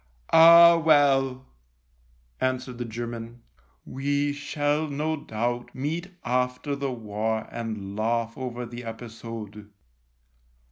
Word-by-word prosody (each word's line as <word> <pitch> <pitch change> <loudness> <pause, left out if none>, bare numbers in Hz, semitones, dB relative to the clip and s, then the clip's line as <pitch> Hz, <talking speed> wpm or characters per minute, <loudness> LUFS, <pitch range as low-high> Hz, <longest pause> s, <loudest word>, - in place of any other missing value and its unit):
" - - -22
Ah, 170 +1 +9
well," 135 -4 +3 0.9
answered 130 -1 -2
the 120 - -3
German, 115 0 -7 0.2
" 60 0 -38
we 145 +1 0
shall 145 +1 -1
no 150 +2 -2
doubt 120 -2 -4
meet 160 +7 -3 0.2
after 125 +3 -1
the 140 -1 -3
war 110 -1 -3
and 110 -4 -5
laugh 115 +1 -1
over 125 -2 -5
the 120 +1 -8
episode. 115 -2 -8
125 Hz, 110 wpm, -26 LUFS, 115-145 Hz, 0.9 s, Ah